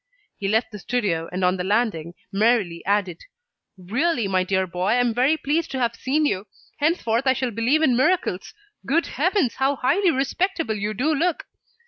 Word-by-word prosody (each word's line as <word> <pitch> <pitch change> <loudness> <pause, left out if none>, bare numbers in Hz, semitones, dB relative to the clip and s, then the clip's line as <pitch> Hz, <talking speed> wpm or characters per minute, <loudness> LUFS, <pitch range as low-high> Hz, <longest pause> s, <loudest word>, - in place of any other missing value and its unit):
He 195 - -4
left 220 +4 +1
the 210 - -8
studio, 185 -7 -1
and 180 +1 -1
on 180 +1 +2
the 180 - -3
landing 190 -5 -1 0.2
merrily 200 -5 +1
added: 195 -4 0 0.6
"Really, 235 - 0
my 185 -1 +1
dear 190 0 0
boy, 180 +1 -3
I 215 - +3
am 245 -2 +2
very 260 +7 +2
pleased 310 +3 -1
to 265 - -2
have 235 -2 0
seen 300 +4 0
you. 200 -7 -1 0.3
Henceforth, 275 -6 +1
I 260 - +5
shall 260 -2 -2
believe 240 +8 +1
in 255 -5 +3
miracles. 265 - 0 0.3
Good 330 +5 +1
heavens! 330 - 0
How 270 +2 +1
highly 365 +10 +2
respectable 330 - -1
you 210 +1 -3
do 300 +8 +1
look!" 330 +3 0
240 Hz, 180 wpm, -23 LUFS, 195-290 Hz, 0.6 s, I